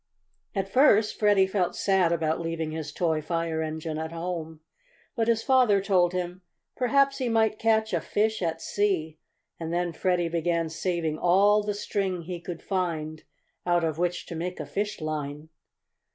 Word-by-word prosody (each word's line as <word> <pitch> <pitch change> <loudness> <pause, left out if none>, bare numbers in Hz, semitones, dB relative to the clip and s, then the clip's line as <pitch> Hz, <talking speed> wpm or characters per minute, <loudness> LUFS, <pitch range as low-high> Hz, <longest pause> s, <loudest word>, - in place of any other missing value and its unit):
At 195 -1 -1
first 215 -2 +4
Freddie 205 -2 +5
felt 190 -2 -1
sad 190 -4 +2
about 160 -1 0
leaving 165 -1 -3
his 155 -1 -5
toy 160 -3 0
fire 165 0 -2
engine 155 0 -4
at 160 0 -4
home, 165 -2 -5 0.5
but 225 -3 0
his 230 -1 +2
father 250 -7 +4
told 185 -3 +2
him 180 0 -4 0.3
perhaps 275 +2 +2
he 255 -2 0
might 220 -1 +2
catch 220 0 +2
a - - +1
fish 220 +1 0
at 165 -2 -2
sea, 175 -7 -1 0.4
and 165 -1 -4
then 175 0 -1
Freddie 175 0 +1
began 165 0 0
saving 165 -2 -2
all 200 +4 +4
the 205 0 -3
string 195 -4 -2
he 175 +1 -5
could 170 -1 -7
find 160 -5 -2 0.4
out 175 -1 +2
of 160 -1 -1
which 180 0 -1
to 170 - -7
make 180 +3 -4
a - - -4
fish 205 +1 -3
line. 150 0 -4
175 Hz, 165 wpm, -27 LUFS, 160-205 Hz, 0.5 s, Freddie